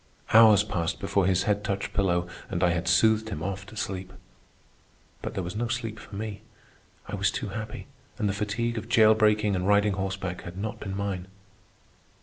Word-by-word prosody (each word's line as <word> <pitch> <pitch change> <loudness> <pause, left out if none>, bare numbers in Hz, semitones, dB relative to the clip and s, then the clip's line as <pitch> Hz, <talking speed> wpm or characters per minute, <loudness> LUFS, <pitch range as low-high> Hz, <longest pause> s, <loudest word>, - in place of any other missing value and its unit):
Hours 110 -2 +8
passed 85 -5 -2
before 95 -2 +1
his 95 -1 +2
head 105 -1 0
touched 100 -1 -3
pillow 90 -4 +1 0.2
and - - -1
I 90 - +4
had 85 0 -2
soothed 110 +5 +4
him 95 - -5
off 100 +1 -4
to 110 - -12
sleep. 95 -3 -4 1.1
But - - -5
there 95 - -2
was 90 +3 -5
no 120 +2 -1
sleep 115 -2 -3
for 100 - -11
me. 105 0 -5 0.7
I - - -8
was - - +2
too - - -4
happy, 110 +2 -6 0.3
and 105 -4 0
the 100 - 0
fatigue 110 +3 -2
of 115 - -11
jail 110 -3 +6
breaking 105 -2 +3
and 90 +1 -1
riding 105 0 +4
horseback 95 -1 -3
had 85 +1 -9
not 110 +3 -4
been 100 -1 -5
mine. 95 -2 -3
100 Hz, 190 wpm, -27 LUFS, 95-110 Hz, 1.1 s, Hours